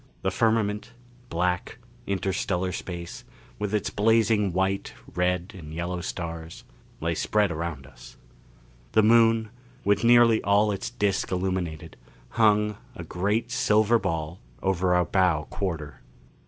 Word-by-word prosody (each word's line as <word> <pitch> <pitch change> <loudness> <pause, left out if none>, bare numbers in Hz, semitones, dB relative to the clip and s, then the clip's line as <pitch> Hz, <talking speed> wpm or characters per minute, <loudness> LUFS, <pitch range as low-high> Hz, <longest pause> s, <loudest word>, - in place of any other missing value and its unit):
The - - +1
firmament 110 0 0 0.4
black, 90 +1 -1 0.3
interstellar 95 -1 -1
space 85 -1 -6 0.4
with 105 -1 -2
its 105 -2 -1
blazing 110 -2 +3
white, 95 +2 -1 0.2
red 90 +1 0
and 80 -5 -10
yellow 85 +2 -3
stars 85 -2 -6 0.4
lay 85 +1 -1
spread 105 +4 +1
around 80 -4 -4
us. - - -15 0.8
The 110 - +5
Moon, 115 0 +4 0.3
with 100 +1 +2
nearly 120 -1 +6
all 105 +1 +3
its 100 -1 -3
disc 100 -2 -1
illumined, 90 -4 -3 0.3
hung, 105 -2 +2 0.2
a - - -7
great 105 +6 -1
silver 110 0 +3
ball, 80 -3 -3 0.2
over 90 -1 +2
our 90 0 +3
bow 90 -3 +2
quarter. 80 -7 -4
95 Hz, 125 wpm, -26 LUFS, 85-105 Hz, 0.8 s, nearly